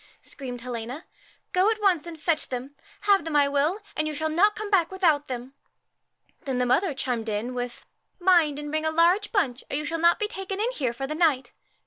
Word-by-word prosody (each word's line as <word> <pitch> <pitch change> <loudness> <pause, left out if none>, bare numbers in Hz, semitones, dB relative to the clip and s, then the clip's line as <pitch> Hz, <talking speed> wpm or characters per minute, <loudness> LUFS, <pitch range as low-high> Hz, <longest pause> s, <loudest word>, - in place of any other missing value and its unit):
screamed 250 -4 -7
Helena; 245 +5 -6 0.2
' - - -35
go 370 +3 +4
at 445 -1 0
once 365 -6 +2
and 335 -1 -7
USCHKA - - -23
fetch 320 0 +1
them. 260 +3 -5 0.3
Have 400 -3 +4
them 320 -1 -4
I 285 -1 +5
will, 290 +6 +1 0.2
and 310 0 0
you 305 - -3
shall 315 +2 -1
not 400 +7 +3
come 430 -1 -5
back 350 -4 +4
without 325 -6 +2
them.' 250 +1 -6 0.9
Then 265 -3 -1
the 250 - +2
mother 300 +5 +2
chimed 240 -4 -2
in 215 +4 -2
with, 245 -1 -5 0.2
' - - -49
Mind 345 -5 +4
and 295 0 -5
bring 310 0 -1
a 315 - +1
large 345 +6 +3
bunch, 270 - 0
or - - -2
you 300 - -3
shall 330 +2 -2
not 340 +1 +5
be 425 - -1
taken 390 -2 -5
in 460 +4 +1
here 265 - -1
for 270 +3 -4
the 290 - -4
night. 295 -7 +1
310 Hz, 235 wpm, -26 LUFS, 260-365 Hz, 0.9 s, I